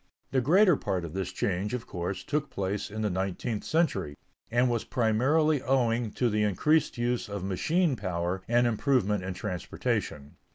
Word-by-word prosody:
The 130 -2 +2
greater 180 - +5
part 90 -9 -2
of 80 - -8
this 95 -1 -3
change, 100 +5 -1
of 120 - -5
course, 90 +2 -4
took 150 0 -2
place 100 +2 -3
in 110 +1 -4
the 105 - +1
nineteenth 95 +4 -2
century, 100 - 0 0.3
and 120 +2 +3
was 120 -2 0
primarily 135 +6 +2
owing 120 -3 +1
to 125 - +1
the 105 -2 +1
increased 140 - +2
use 120 -2 -1
of 100 -2 -4
machine 155 - +1
power 90 -2 -2
and 120 +1 +3
improvement 110 -4 +1
in 95 0 -4
transportation. 85 -7 -3
110 Hz, 165 wpm, -28 LUFS, 95-130 Hz, 0.3 s, greater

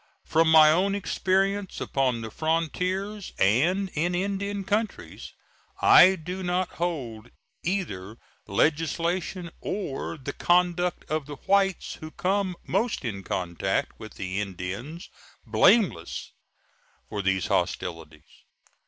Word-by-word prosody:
From 160 0 +3
my 155 -1 +8
own 195 +5 +2
experience 195 0 0
upon 130 -4 0
the 110 -1 -6
frontiers 180 - -2
and 175 - +2
in 175 +4 0
Indian 200 +2 -2
countries, 210 +3 -3 0.5
I 185 +2 +8
do 180 +3 -6
not 180 0 0
hold 125 -10 -4 0.3
either 115 - -3 0.3
legislation 165 - 0
or 165 -5 -4
the 140 0 -6
conduct 175 0 +1
of 155 -2 -2
the 145 - -6
whites 195 -2 +1
who 155 - -6
come 190 +2 -1
most 200 - -1
in 100 -4 -3
contact 90 -2 -2
with 110 -2 -10
the 95 +1 -3
Indian 100 - -6 0.4
blameless 115 - +2 0.8
for 105 - -3
these 95 -1 +1
hostilities. 80 -3 -2
165 Hz, 110 wpm, -26 LUFS, 115-190 Hz, 0.8 s, my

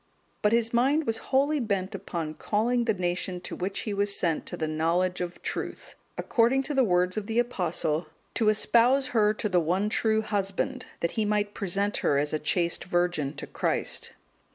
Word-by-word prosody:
But 210 - +3
his 230 0 +1
mind 275 +6 +3
was 225 -2 -1
wholly 285 +3 +2
bent 200 -4 -1
upon 165 -5 -4
calling 235 +7 0
the 220 - +2
nation 180 0 -2
to - - -5
which 195 +2 -2
he 210 - -3
was 200 0 +1
sent 165 -3 0
to - - -3
the 160 - -2
knowledge 170 +4 0
of 175 0 -5
truth; - - -5 0.2
according 245 +3 +2
to 295 - -4
the 270 -2 +4
words 180 -2 +2
of 210 -1 -3
the 225 0 -2
Apostle, 175 -9 0 0.3
"To 220 -2 +2
espouse 240 +5 +4
her 215 -3 +3
to 210 - -1
the 180 -3 +3
one 185 +6 0
true 220 0 +1
Husband, 210 +5 -2
that 170 - 0
he 220 - -1
might 210 -1 0
present 200 +1 -1
her 140 - +1
as 145 +2 0
a 155 - 0
chaste 170 +2 0
virgin 175 -5 0
to - - -6
Christ." - - -2
200 Hz, 190 wpm, -27 LUFS, 175-230 Hz, 0.3 s, the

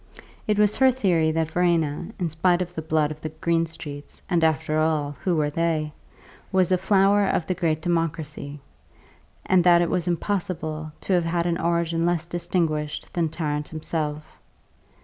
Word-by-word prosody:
It 210 -1 +2
was 210 0 +3
her 265 0 +6
theory 185 -11 +2
that 160 -1 -1
Verena 170 -2 +1
(in 180 - -1
spite 175 +3 +2
of 175 0 -11
the 160 - -4
blood 155 -1 +1
of 155 0 -8
the 155 - -4
Greenstreets, 160 -3 -3
and, 175 -3 +1
after 155 -1 +1
all, 155 -2 0
who 180 -2 +1
were 150 -2 +1
they?) 155 -1 -1 0.6
was 185 -1 +2
a 185 - +4
flower 195 +1 +4
of 175 - 0
the 185 - 0
great 165 -3 -1
Democracy, 155 -4 -2 0.9
and 185 -2 +4
that 175 -1 +6
it 170 - -2
was 180 -1 -1
impossible 160 -4 -2
to 195 - -1
have 175 -2 +2
had 170 0 0
an 170 -1 0
origin 170 -1 0
less 170 -1 +1
distinguished 170 -3 -2
than 170 -2 0
Tarrant 150 -2 -3
himself. 155 -1 -3
165 Hz, 170 wpm, -24 LUFS, 155-175 Hz, 0.9 s, her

